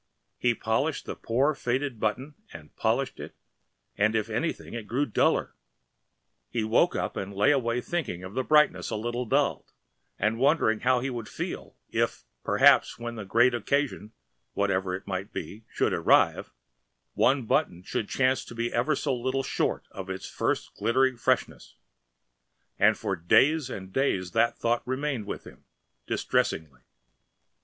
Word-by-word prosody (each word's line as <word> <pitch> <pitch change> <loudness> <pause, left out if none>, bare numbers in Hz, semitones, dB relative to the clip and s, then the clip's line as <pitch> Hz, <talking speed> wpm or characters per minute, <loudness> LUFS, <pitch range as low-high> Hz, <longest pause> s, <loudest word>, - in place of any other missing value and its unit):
He - - +2
polished - - -1
the - - -5
poor 135 +6 +1
faded 130 -2 -2
button 125 +8 -2 0.2
and 75 -3 -12
polished - - 0
it, - - -8 0.6
and 110 +2 +2
if 110 0 -1
anything 120 +10 -3
it 115 -3 -6
grew 135 +5 0
duller. 110 - +1 1.0
He 115 -2 -1
woke 115 +11 +3
up - - -2
and 95 +1 -4
lay 105 +8 +4
awake 120 -3 0
thinking 125 - -3
of 95 +1 -8
the 130 - 0
brightness 150 +2 +3
a 110 - -2
little 120 +3 -3
dulled - - 0 0.5
and 110 +3 0
wondering 135 -6 +3
how 130 -1 +2
he 135 +1 -2
would 120 -3 -6
feel - - -6
if - - -1 0.2
perhaps - - +4
when 120 0 -5
the 110 -3 -7
great 120 +5 +4
occasion 120 -2 -1 0.4
(whatever 95 -2 0
it 95 - -8
might 95 +2 -4
be) 100 +7 -7
should - - +1
arrive, - - +3 0.6
one 130 -1 +2
button 90 -4 0
should 100 - -3
chance 130 0 +1
to 120 - -10
be 115 +1 -2
ever 135 +6 +1
so 140 -3 -1
little 130 +2 -1
short - - -1
of 95 -1 -7
its 95 0 -5
first - - -2
glittering 130 +4 +2
freshness, 120 - -1 1.0
and - - +5
for 95 - -2
days 135 - +3
and 95 -5 -7
days 95 -10 0
that 115 +6 +2
thought 120 +1 +1
remained 130 -4 -2
with - - -5
him, - - -14 0.4
distressingly. 70 -6 -1
115 Hz, 155 wpm, -27 LUFS, 100-130 Hz, 1.0 s, and